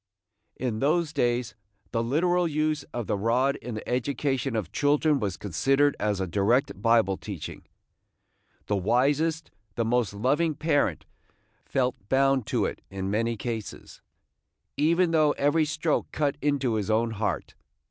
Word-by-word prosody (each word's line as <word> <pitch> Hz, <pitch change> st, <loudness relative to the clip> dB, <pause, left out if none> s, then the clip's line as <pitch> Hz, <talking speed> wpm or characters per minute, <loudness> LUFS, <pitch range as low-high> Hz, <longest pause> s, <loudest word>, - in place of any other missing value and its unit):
In 120 Hz, -4 st, -2 dB
those 160 Hz, +3 st, +1 dB
days 120 Hz, -4 st, 0 dB, 0.4 s
the 115 Hz, -, 0 dB
literal 175 Hz, +8 st, +1 dB
use 155 Hz, -1 st, 0 dB
of 120 Hz, -2 st, -4 dB
the -, -, -1 dB
rod 120 Hz, +7 st, +1 dB
in 120 Hz, -1 st, -7 dB
the 110 Hz, -, -7 dB
education 130 Hz, 0 st, -1 dB
of 100 Hz, -5 st, -3 dB
children 145 Hz, +3 st, +2 dB
was 100 Hz, -5 st, -2 dB
considered 135 Hz, -, +2 dB
as 105 Hz, -2 st, 0 dB
a 95 Hz, -, 0 dB
direct 105 Hz, -, +1 dB
Bible 115 Hz, -4 st, +3 dB
teaching. 95 Hz, -8 st, -7 dB, 1.0 s
The 105 Hz, -, 0 dB
wisest, 145 Hz, -, +1 dB, 0.2 s
the 115 Hz, -, 0 dB
most 120 Hz, -1 st, +1 dB
loving 145 Hz, +9 st, +1 dB
parent 145 Hz, -1 st, 0 dB, 0.6 s
felt 125 Hz, -2 st, 0 dB, 0.2 s
bound 135 Hz, -2 st, +2 dB
to -, -, +1 dB
it -, -, -4 dB
in 95 Hz, 0 st, -4 dB
many 115 Hz, +2 st, 0 dB
cases, 110 Hz, -1 st, -6 dB, 0.7 s
even 170 Hz, +3 st, +2 dB
though 155 Hz, -2 st, +4 dB
every 150 Hz, +3 st, +2 dB
stroke 155 Hz, +1 st, -1 dB
cut 145 Hz, -2 st, 0 dB
into 140 Hz, -4 st, +1 dB
his 110 Hz, -1 st, -2 dB
own 115 Hz, +1 st, +2 dB
heart. 105 Hz, -7 st, -3 dB
125 Hz, 145 wpm, -27 LUFS, 110-145 Hz, 1.0 s, though